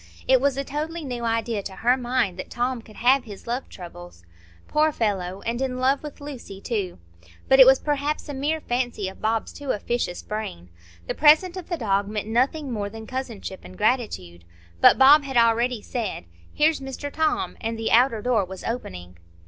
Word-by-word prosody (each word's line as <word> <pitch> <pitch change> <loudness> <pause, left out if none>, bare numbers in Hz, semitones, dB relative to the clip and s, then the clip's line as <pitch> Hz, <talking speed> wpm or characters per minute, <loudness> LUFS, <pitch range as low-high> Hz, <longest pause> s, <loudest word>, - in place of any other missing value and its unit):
It 260 -1 +5
was 275 -1 +1
a 275 - -1
totally 310 +4 -4
new 245 -3 -4
idea 230 -1 -1
to 190 -1 -7
her 245 +5 +3
mind 245 -7 -1
that - - -6
Tom 245 0 -2
could 215 -1 -16
have 255 +3 +3
his 205 -3 -10
love 245 +3 -3
troubles. 175 - -11 0.4
Poor 310 +1 +2
fellow!—and 205 0 -2
in 260 -1 -1
love 265 +2 +2
with 300 -2 -9
Lucy 265 -9 -8
too! 200 -5 -3 0.5
But 265 - +5
it 260 - +10
was 265 0 +7
perhaps 295 +1 -2
a 290 - -5
mere 295 +4 -1
fancy 245 -6 -2
of 190 - -14
Bob's 220 +1 -1
too 285 -1 -8
officious 220 -4 -2
brain. 90 - -6 0.4
The - - -2
present 315 +5 +5
of 370 -3 -8
the 345 - -1
dog 200 -5 0
meant 210 0 -4
nothing 260 +5 0
more 205 -3 -3
than 220 +1 -9
cousinship 235 -7 -5
and 185 - -12
gratitude. 210 - -1 0.4
But - - +7
Bob 285 +3 +7
had 265 -2 -3
already 235 0 +3
said, 225 - -4 0.3
"Here's 310 +1 +2
Mr 270 +2 -6
Tom," 315 0 0
and 225 0 -3
the 225 0 -2
outer 230 -2 +4
door 245 -5 +2
was 190 0 -8
opening. 90 - -6
240 Hz, 190 wpm, -24 LUFS, 205-270 Hz, 0.5 s, it